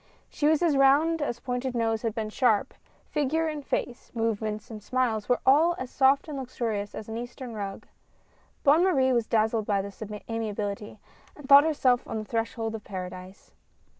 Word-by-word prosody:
She 295 Hz, -, 0 dB
was 315 Hz, +2 st, +3 dB
as 325 Hz, -4 st, +3 dB
round 290 Hz, +4 st, +4 dB
as 240 Hz, -5 st, -2 dB
Pointed 250 Hz, 0 st, -3 dB
Nose 225 Hz, -2 st, 0 dB
had 225 Hz, -2 st, -2 dB
been 215 Hz, -2 st, -3 dB
sharp 220 Hz, -4 st, +2 dB, 0.2 s
— -, -, -35 dB
figure 305 Hz, +2 st, 0 dB
and 305 Hz, -2 st, -4 dB
face, 245 Hz, -2 st, -3 dB
movements 220 Hz, 0 st, -2 dB
and 215 Hz, -1 st, -8 dB
smiles, 230 Hz, -2 st, -1 dB
were 245 Hz, -, +2 dB
all 315 Hz, +6 st, +5 dB
as 255 Hz, -1 st, -6 dB
soft 270 Hz, +2 st, +3 dB
and 290 Hz, -3 st, -5 dB
luxurious 230 Hz, -5 st, -3 dB
as 215 Hz, -, -7 dB
an 225 Hz, 0 st, -5 dB
Eastern 245 Hz, 0 st, -7 dB
rug. 200 Hz, -2 st, -6 dB, 0.8 s
Bonne 300 Hz, +5 st, +5 dB
Marie 265 Hz, -9 st, +3 dB
was 235 Hz, -2 st, +1 dB
dazzled 220 Hz, -1 st, +1 dB
by 200 Hz, -1 st, +2 dB
this 200 Hz, +1 st, -7 dB, 0.3 s
amiability, 210 Hz, -2 st, -4 dB, 0.4 s
and 290 Hz, -3 st, -11 dB
thought 280 Hz, +1 st, +9 dB
herself 260 Hz, -6 st, +2 dB
on -, -, -4 dB
the 215 Hz, -, -4 dB
threshold 225 Hz, 0 st, -2 dB
of 220 Hz, -2 st, -6 dB
Paradise. 185 Hz, 0 st, -8 dB
240 Hz, 180 wpm, -27 LUFS, 215-275 Hz, 0.8 s, thought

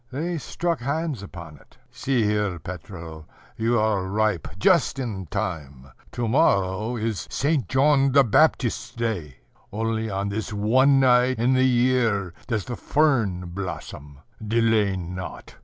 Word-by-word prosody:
They 165 Hz, +5 st, -3 dB
struck 170 Hz, +4 st, -2 dB
hands 140 Hz, 0 st, -2 dB
upon 85 Hz, -6 st, -10 dB
it. -, -, -23 dB
"See 125 Hz, -1 st, 0 dB
here, 105 Hz, -3 st, 0 dB
Petro, 85 Hz, -3 st, -9 dB, 0.3 s
you 115 Hz, +2 st, +1 dB
are 105 Hz, -3 st, 0 dB
ripe 105 Hz, -2 st, 0 dB
just 170 Hz, -, +3 dB
in 105 Hz, -9 st, -4 dB
time: 70 Hz, -6 st, -5 dB, 0.2 s
to 120 Hz, -1 st, -2 dB
morrow 110 Hz, -, +2 dB
is 110 Hz, -3 st, -3 dB
St. 140 Hz, -, 0 dB
John 135 Hz, 0 st, +3 dB
the 140 Hz, +1 st, +6 dB
Baptist's 125 Hz, 0 st, +1 dB
day. 105 Hz, -, -3 dB, 0.4 s
Only 110 Hz, +1 st, -2 dB
on 100 Hz, 0 st, -2 dB
this 110 Hz, +3 st, -4 dB
one 130 Hz, +7 st, +3 dB
night 125 Hz, 0 st, +4 dB
in 120 Hz, +3 st, +2 dB
the 130 Hz, 0 st, +3 dB
year 120 Hz, -7 st, +1 dB
does 110 Hz, -5 st, -2 dB
the 120 Hz, -, -5 dB
fern 115 Hz, -, +1 dB
blossom. 75 Hz, -6 st, -7 dB, 0.2 s
Delay 110 Hz, -2 st, +2 dB
not. 90 Hz, 0 st, -7 dB
110 Hz, 140 wpm, -24 LUFS, 95-130 Hz, 0.4 s, the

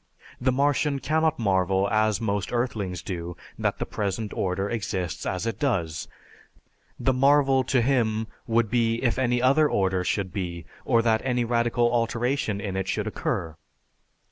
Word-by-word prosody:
The 130 Hz, +1 st, +3 dB
Martian 140 Hz, +2 st, +1 dB
cannot 160 Hz, +2 st, +1 dB
marvel 95 Hz, -2 st, +2 dB
as 110 Hz, -1 st, +2 dB
most 100 Hz, -3 st, -2 dB
earthlings 105 Hz, -8 st, -2 dB
do 85 Hz, -2 st, -5 dB, 0.2 s
that -, -, 0 dB
the -, -, -3 dB
present 105 Hz, +1 st, -3 dB
order 95 Hz, +1 st, -1 dB
exists 95 Hz, -6 st, -3 dB
as 90 Hz, +3 st, -2 dB
it 115 Hz, -4 st, -3 dB
does; 85 Hz, -, -1 dB, 0.9 s
the 130 Hz, -, +2 dB
marvel 135 Hz, 0 st, +4 dB
to 125 Hz, -3 st, +2 dB
him 115 Hz, -4 st, +1 dB, 0.2 s
would 115 Hz, -2 st, +1 dB
be 115 Hz, -2 st, +2 dB
if 120 Hz, 0 st, +1 dB
any 125 Hz, -1 st, +1 dB
other 145 Hz, +4 st, +4 dB
order 95 Hz, -2 st, +1 dB
should 95 Hz, -1 st, -1 dB
be 85 Hz, -4 st, -4 dB, 0.2 s
or 115 Hz, -2 st, +3 dB
that 110 Hz, -1 st, +2 dB
any 125 Hz, -2 st, 0 dB
radical 120 Hz, 0 st, +1 dB
alteration 115 Hz, -1 st, 0 dB
in 100 Hz, -1 st, -4 dB
it 95 Hz, 0 st, -2 dB
should -, -, -1 dB
occur. 80 Hz, -2 st, -3 dB
115 Hz, 155 wpm, -26 LUFS, 95-125 Hz, 0.9 s, marvel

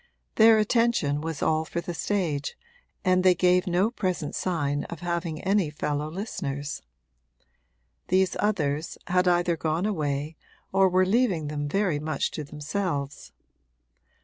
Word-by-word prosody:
Their 220 Hz, 0 st, +7 dB
attention 215 Hz, -, +2 dB
was 160 Hz, -2 st, -4 dB
all 155 Hz, 0 st, +2 dB
for 165 Hz, +2 st, -4 dB
the 175 Hz, 0 st, -5 dB
stage 165 Hz, -6 st, -2 dB, 0.5 s
and 185 Hz, 0 st, +3 dB
they 185 Hz, -1 st, +5 dB
gave 180 Hz, +1 st, +3 dB
no 185 Hz, +5 st, +2 dB
present 185 Hz, -9 st, -2 dB
sign 145 Hz, -6 st, -1 dB
of 170 Hz, -, -8 dB
having 170 Hz, -2 st, -2 dB
any 195 Hz, -4 st, +2 dB
fellow 150 Hz, 0 st, -2 dB
listeners. 145 Hz, -6 st, -4 dB, 1.3 s
These 185 Hz, 0 st, +2 dB
others 160 Hz, -7 st, -1 dB
had 180 Hz, 0 st, +2 dB
either 175 Hz, -1 st, +3 dB
gone 160 Hz, +4 st, -1 dB
away 150 Hz, -5 st, -2 dB, 0.3 s
or 190 Hz, 0 st, +4 dB
were 185 Hz, +1 st, +3 dB
leaving 190 Hz, -8 st, +1 dB
them 145 Hz, -1 st, -3 dB
very 190 Hz, -4 st, +1 dB
much 155 Hz, -1 st, -2 dB
to 155 Hz, -, -5 dB
themselves. 150 Hz, 0 st, -4 dB
170 Hz, 135 wpm, -26 LUFS, 150-190 Hz, 1.3 s, Their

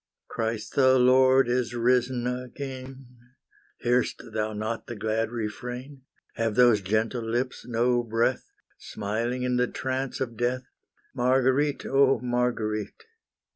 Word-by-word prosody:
Christ 110 Hz, -1 st, -3 dB
the 130 Hz, -1 st, +5 dB
Lord 130 Hz, +1 st, +5 dB
is 120 Hz, -1 st, 0 dB
risen 125 Hz, +1 st, +1 dB
again, 130 Hz, +1 st, -6 dB, 0.8 s
Hear'st 120 Hz, -2 st, 0 dB
thou 110 Hz, 0 st, -1 dB
not 110 Hz, +2 st, -4 dB
the 120 Hz, -, -6 dB
glad 110 Hz, +1 st, -1 dB
refrain, 125 Hz, +4 st, -6 dB, 0.3 s
Have 115 Hz, -2 st, -1 dB
those 120 Hz, -4 st, +5 dB
gentle 110 Hz, +5 st, 0 dB
lips 120 Hz, +4 st, -3 dB
no 120 Hz, +1 st, +2 dB
breath, 115 Hz, +2 st, -1 dB, 0.3 s
Smiling 115 Hz, +5 st, -3 dB
in 125 Hz, -1 st, 0 dB
the 125 Hz, 0 st, +2 dB
trance 130 Hz, +1 st, -3 dB
of 120 Hz, -3 st, -3 dB
death? 125 Hz, +2 st, 0 dB, 0.5 s
Marguerite, 130 Hz, +3 st, +2 dB
oh 135 Hz, 0 st, +4 dB
Marguerite! 120 Hz, -, -2 dB
125 Hz, 120 wpm, -26 LUFS, 115-130 Hz, 0.8 s, the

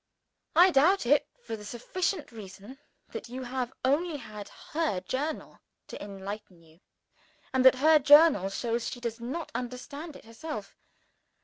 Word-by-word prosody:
I 360 Hz, +3 st, +7 dB
doubt 330 Hz, +4 st, +4 dB
it, 285 Hz, +4 st, +3 dB, 0.2 s
for 225 Hz, -, -4 dB
the 210 Hz, -, -10 dB
sufficient 310 Hz, -, -3 dB
reason 210 Hz, +4 st, -11 dB, 0.3 s
that -, -, -7 dB
you 255 Hz, +2 st, -6 dB
have 250 Hz, 0 st, -3 dB
only 300 Hz, +4 st, +1 dB
had 210 Hz, -5 st, -9 dB, 0.2 s
her 310 Hz, -, 0 dB
Journal 275 Hz, +11 st, -4 dB, 0.3 s
to -, -, -7 dB
enlighten 195 Hz, -3 st, -8 dB
you, 160 Hz, +1 st, -22 dB, 0.7 s
and 260 Hz, -1 st, +3 dB
that 260 Hz, 0 st, +8 dB
her 310 Hz, +4 st, +5 dB
Journal 290 Hz, -, +6 dB
shows 235 Hz, +3 st, -2 dB
she 245 Hz, -, -7 dB
does 235 Hz, -1 st, -4 dB
not 265 Hz, +8 st, -5 dB
understand 280 Hz, +5 st, -6 dB
it -, -, -13 dB
herself. 225 Hz, -3 st, -7 dB
255 Hz, 145 wpm, -29 LUFS, 215-300 Hz, 0.7 s, that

